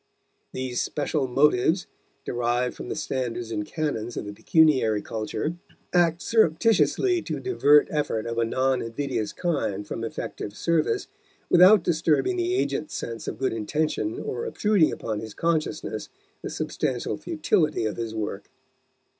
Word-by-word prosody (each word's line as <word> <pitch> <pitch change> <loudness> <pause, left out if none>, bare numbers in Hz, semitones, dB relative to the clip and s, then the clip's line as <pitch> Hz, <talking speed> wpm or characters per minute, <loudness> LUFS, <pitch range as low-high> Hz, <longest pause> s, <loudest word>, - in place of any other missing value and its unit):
These 130 -2 -2
special 145 -2 -1
motives, 150 +6 +3 0.4
derived 120 +1 0
from - - -8
the - - -2
standards 120 -3 -3
and 105 - -1
canons 120 -4 -3
of - - -3
the 105 - -6
pecuniary 130 -6 +3
culture, 115 +9 -3 0.4
act 175 -1 +3
surreptitiously 225 - +3
to - - -4
divert 150 - +4
effort 145 -8 -1
of 115 0 -2
a - - +3
non 130 +3 +1
invidious 115 -2 -3
kind 140 - -2
from 115 - -4
effective 105 -2 -5
service, 170 - +1 0.5
without 185 +2 +7
disturbing 165 - +1
the 360 +1 0
agent's 155 - -1
sense 115 -1 -5
of - - -4
good 130 -2 0
intention 155 - -1
or 460 - -4
obtruding 210 - +2
upon 110 -2 -3
his 110 -1 -8
consciousness 165 -2 -1 0.3
the - - -5
substantial - - -2
futility 185 - 0
of 110 - -2
his 115 -1 -4
work. 105 -2 -4
145 Hz, 140 wpm, -25 LUFS, 115-170 Hz, 0.5 s, without